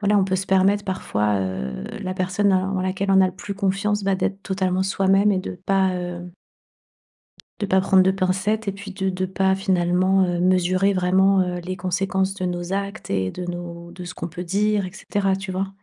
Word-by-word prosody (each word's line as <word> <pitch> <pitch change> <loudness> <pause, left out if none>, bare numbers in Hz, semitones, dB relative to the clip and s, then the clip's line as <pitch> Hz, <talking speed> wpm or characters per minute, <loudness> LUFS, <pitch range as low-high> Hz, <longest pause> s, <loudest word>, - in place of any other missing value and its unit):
voilà 205 0 +3
on 190 - +3
peut 190 -1 0
se 190 - -3
permettre 195 +2 +3
parfois, 105 - -1
heu, 65 -10 -4 0.2
la 185 0 -3
personne 190 +2 +1
en 190 0 0
laquelle 190 +1 -1
on 190 - +6
a 190 - +5
le 185 - -4
plus 200 - -6
confiance 200 +2 0
bah 195 - +2
d'être 195 +1 -2
totalement 190 -1 0
soi-même 195 +1 +3
et 190 - +1
de 185 - -7
pas, 190 -1 +2
heu 175 0 -6 1.3
de 205 - -2
pas 190 0 +3
prendre 190 0 +4
de 190 - +3
pincettes 195 +3 0
et - - 0
puis 200 0 -9
de 190 -1 -1
de 185 0 -2
pas 190 0 +1
finalement, 185 0 +2
heu, 175 -1 -1
mesurer 185 +2 +3
vraiment, 190 +1 +3
heu, 180 -1 -3
les 185 +2 -5
conséquences 190 +1 -1
de 190 -2 -4
nos 175 +1 -3
actes 200 +2 -4
et 95 -1 0
de 180 - -6
nos 175 -1 -7
de 180 0 -9
ce 180 - -7
qu'on 170 - -5
peut 175 +2 -7
dire 200 +2 +1
et 180 - -9
cetera, 195 -1 -1
tu 195 -1 -6
vois? 190 +1 -2
190 Hz, 210 wpm, -22 LUFS, 180-195 Hz, 1.3 s, on